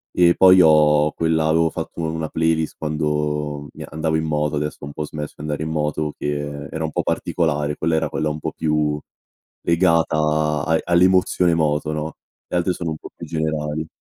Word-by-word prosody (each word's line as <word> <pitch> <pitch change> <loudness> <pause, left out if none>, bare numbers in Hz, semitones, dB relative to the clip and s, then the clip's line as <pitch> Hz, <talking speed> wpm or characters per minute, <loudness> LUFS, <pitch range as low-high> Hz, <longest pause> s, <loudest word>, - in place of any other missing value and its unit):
E 85 -1 +5
poi 95 0 +7
ho 75 -2 +5
quella 80 -1 +1
avevo 80 +1 +3
fatto 85 - -6
u - - -3
una 80 -1 -3
playlist 80 -1 0
quando 75 -1 -2
mi - - -8
andavo 80 +1 -1
in 80 - -1
moto, 75 -1 0
adesso 75 +1 -3
ho - - -6
un 70 - -8
po' 75 - -4
smesso 75 0 -6
di - - -10
andare 75 -1 -3
in 80 - -3
moto 75 -1 -1
che 75 0 -4
era 80 - -3
un 80 - -2
po' - - -1
particolare. 75 -3 -1
Quella 80 0 0
era 80 - 0
quella 75 -1 -1
un 75 0 -4
po' - - -3
più 75 -1 0 0.7
legata 85 -2 +3 0.5
a 80 0 +2
all'emozione 90 0 +3
moto, 75 -1 0
no, 75 +1 -4 0.3
le - - -2
altre 90 +1 +1
sono 85 -2 -3
un 80 - -4
po' - - -10
più - - -8
generali. 80 -1 -2
80 Hz, 195 wpm, -21 LUFS, 75-80 Hz, 0.7 s, poi